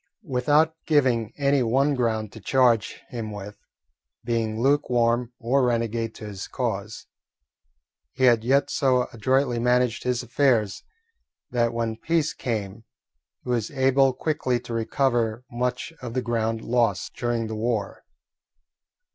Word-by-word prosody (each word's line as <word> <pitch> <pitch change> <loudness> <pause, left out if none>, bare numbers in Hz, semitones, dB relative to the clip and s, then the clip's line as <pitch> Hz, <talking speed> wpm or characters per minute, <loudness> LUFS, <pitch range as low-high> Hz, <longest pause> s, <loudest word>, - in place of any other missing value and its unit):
Without 145 +3 +2
giving 125 -7 +2
any 140 -1 +2
one 135 +5 +2
ground 110 -5 -1
to 110 - -11
charge 120 +1 +2
him 115 -3 -5
with 105 0 -8 0.6
being 115 -2 -1
lukewarm 120 -3 +2
or 130 +4 +1
renegade 115 -2 -1
to 110 - -9
his 100 -3 -7
cause, 115 -4 -4 1.1
he 130 - -3
had 120 -3 +5
yet 135 +4 +2
so 130 -2 +2
adroitly 130 +1 +1
managed 125 -1 +2
his 125 0 -1
affairs 120 -4 +1 0.7
that 120 -2 +1
when 115 -1 -2
peace 160 +4 0
came 110 -3 -4 0.6
he - - -8
was 115 -3 0
able 135 0 +3
quickly 130 -3 -1
to 120 - -7
recover 115 0 0
much 125 +5 -2
of 115 - -6
the 130 - +1
ground 115 -1 -1
lost 115 -6 0
during 120 -1 -1
the 110 - -5
war. 110 -2 -2
120 Hz, 130 wpm, -25 LUFS, 115-130 Hz, 1.1 s, had